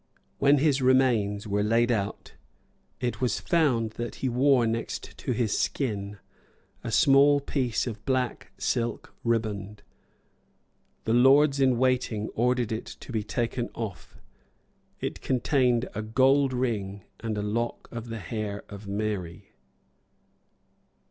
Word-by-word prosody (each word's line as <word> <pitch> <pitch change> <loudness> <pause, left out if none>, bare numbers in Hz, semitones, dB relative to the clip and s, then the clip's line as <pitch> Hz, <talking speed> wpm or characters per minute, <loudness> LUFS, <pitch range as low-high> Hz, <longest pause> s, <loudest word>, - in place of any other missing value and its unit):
When 140 +1 +5
his 140 -1 +2
remains 120 -6 +2
were 105 -1 0
laid 115 +3 +2
out, 100 -4 -3 0.7
it 120 -3 -3
was 125 -4 +1
found 135 - +1
that 120 - -4
he 130 - -2
wore 125 0 +3
next 115 +1 -3
to - - -3
his 115 -3 0
skin 105 -6 -2 0.7
a - - -4
small 140 +1 +5
piece 130 -5 -1
of 110 -4 -6
black 125 -5 -1
silk 115 +4 -2
riband. 105 -3 -2 1.2
The 110 - 0
lords 135 +3 +5
in 130 -3 +3
waiting 125 -4 0
ordered 125 0 0
it 110 - -3
to - - -10
be 110 -2 -1
taken 120 +2 -2
off. 100 - -7 0.8
It - - -4
contained 125 -1 +1
a 105 - -3
gold 130 +5 +3
ring 105 -6 -2 0.2
and 110 -2 -3
a 105 - -2
lock 115 +3 -2
of 115 -1 -6
the 115 - -4
hair 105 +1 -4
of 100 0 -9
Mary. 100 -2 -4
115 Hz, 130 wpm, -27 LUFS, 105-130 Hz, 1.2 s, When